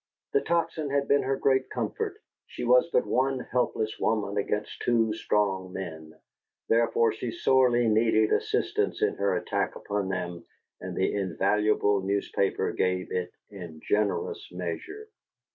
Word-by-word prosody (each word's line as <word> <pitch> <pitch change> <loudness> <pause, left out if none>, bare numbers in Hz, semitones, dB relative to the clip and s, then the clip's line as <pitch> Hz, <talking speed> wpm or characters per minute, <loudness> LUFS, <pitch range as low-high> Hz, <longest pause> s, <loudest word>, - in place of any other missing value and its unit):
The 425 - +4
Tocsin 165 -3 -1
had 140 0 0
been 140 0 +4
her 135 +1 0
great 130 -1 +2
comfort: 430 -3 -3 0.3
she - - -7
was - - +4
but 485 +1 +2
one 135 +1 +1
helpless 110 -3 -1
woman 105 -2 0
against 105 +1 -2
two 115 -2 +2
strong 100 -4 0
men; 80 -4 -7 0.5
therefore 115 0 +3
she 115 +2 -4
sorely 120 0 +3
needed 110 0 +3
assistance - - 0
in - - +2
her 100 -2 +1
attack - - -1
upon 100 -2 -3
them, 90 -2 -4 0.4
and - - -6
the - - +1
invaluable 100 +2 +1
newspaper 100 0 0
gave 90 0 -1
it 90 -1 -2 0.2
in 85 -6 -9
generous 105 -1 0
measure. 90 - -6
105 Hz, 140 wpm, -27 LUFS, 95-130 Hz, 0.5 s, The